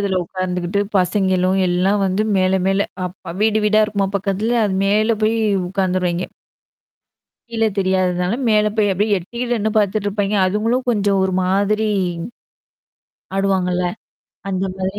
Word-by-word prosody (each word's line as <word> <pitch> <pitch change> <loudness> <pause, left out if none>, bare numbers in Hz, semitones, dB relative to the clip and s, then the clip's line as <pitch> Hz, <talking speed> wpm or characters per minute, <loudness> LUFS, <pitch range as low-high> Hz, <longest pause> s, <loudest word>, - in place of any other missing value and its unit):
இதில 200 -2 -1
உட்கார்ந்துக்கிட்டு 180 +1 -2 0.2
பசங்களும் 190 0 +1
எல்லாம் 190 +3 +1
வந்து 190 +3 0
மேல 185 0 +2
மேல 195 +1 +1 0.2
அப்ப 180 -1 -7
வீடு 220 0 +3
வீடா 215 +1 +4
இருக்குமா 200 -2 -1
பக்கத்துல 205 +4 -1
அது 195 - -1
மேல 215 +3 +2
போய் 220 +1 +2 0.3
உட்காந்துருவெய்ங்கெ. 185 -2 -1 1.2
கீழ 225 -1 -2 0.2
தெரியாததுனால 185 0 +1
மேல 215 -1 +3
போய் 205 -2 +2
அப்படியியே 205 +2 +1
எட்டி 235 +8 -6
நின்னு 220 -2 0
பார்த்துட்டுருப்பாங்கெ. 205 0 0
அதுங்களும் 225 +6 0
கொஞ்சம் 200 -3 +1
ஒரு 190 - -1
மாதிரி. 205 +3 +1 1.5
ஆடுவாங்கல்ல. 185 -2 +1 0.6
அந்த 190 0 -1
மாரி 190 +2 -3
195 Hz, 125 wpm, -19 LUFS, 185-210 Hz, 1.5 s, வீடா